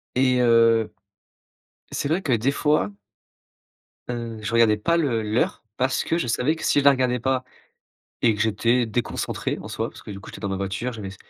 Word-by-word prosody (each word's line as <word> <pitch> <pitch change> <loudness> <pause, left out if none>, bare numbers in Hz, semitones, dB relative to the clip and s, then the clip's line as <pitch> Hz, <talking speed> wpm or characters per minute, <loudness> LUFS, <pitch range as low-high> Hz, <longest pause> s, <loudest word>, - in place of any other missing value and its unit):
et 125 -1 +3
heu, 115 -2 +4 1.0
c'est 140 - -2
vrai 175 +5 0
que 140 - -1
des 120 +3 +2
fois 150 -8 +1 1.2
heu, 115 -2 -4
je 105 - -3
regardais 115 -2 +4
pas 170 +11 +1
le 125 -9 +1
l'heure 110 +3 -1
parce 130 +1 +1
que 165 - 0
je 170 - -1
savais 125 +7 +1
que - - -7
si 145 - +3
je 140 - -4
la 140 - +9
regardais 125 -3 +1
pas 130 0 0 0.8
et 115 -3 +4
que 105 - -7
j'étais 115 +3 +2
déconcentré, 115 +1 -2
en - - -8
soi, - - -3
parce - - -14
que - - -10
du 100 -1 -7
coup, - - -11
j'étais - - -10
dans 100 - -3
ma 95 - -2
voiture, 100 +6 -3
j'avais 105 -4 -6
s 95 - -10
120 Hz, 205 wpm, -24 LUFS, 110-130 Hz, 1.2 s, la